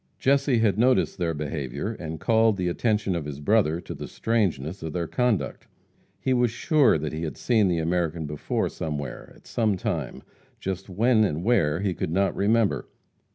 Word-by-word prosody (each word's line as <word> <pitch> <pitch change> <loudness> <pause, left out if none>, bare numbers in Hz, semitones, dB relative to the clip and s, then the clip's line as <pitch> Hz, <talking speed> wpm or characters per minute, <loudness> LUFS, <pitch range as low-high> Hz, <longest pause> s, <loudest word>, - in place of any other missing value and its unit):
Jesse 140 -1 +2
had 110 -3 +2
noticed 125 -4 +2
their 85 -2 0
behavior, 75 - -3
and 80 -6 -6
called 110 0 +3
the 90 -1 0
attention 105 0 0
of 85 -4 -3
his 75 -1 -6
brother 85 -1 +2
to - - -7
the - - -7
strangeness 95 -7 -1
of 80 -1 -5
their 85 -1 -1
conduct. 125 +3 -1 0.5
He 130 - 0
was 120 -1 +3
sure 145 - +3
that 75 0 -4
he 80 - -4
had 80 -2 -4
seen 110 -5 +2
the 90 -2 +1
American 85 -1 -1
before 75 0 -2
somewhere, 75 -4 -5
at - - -21
some 110 -4 0
time, - - -3 0.4
just 95 +1 -4
when 110 +4 +3
and 85 -4 -1
where 90 -8 +2
he 100 -2 0
could - - -3
not 95 +3 +1
remember. 110 +1 +1
95 Hz, 180 wpm, -25 LUFS, 80-115 Hz, 0.5 s, called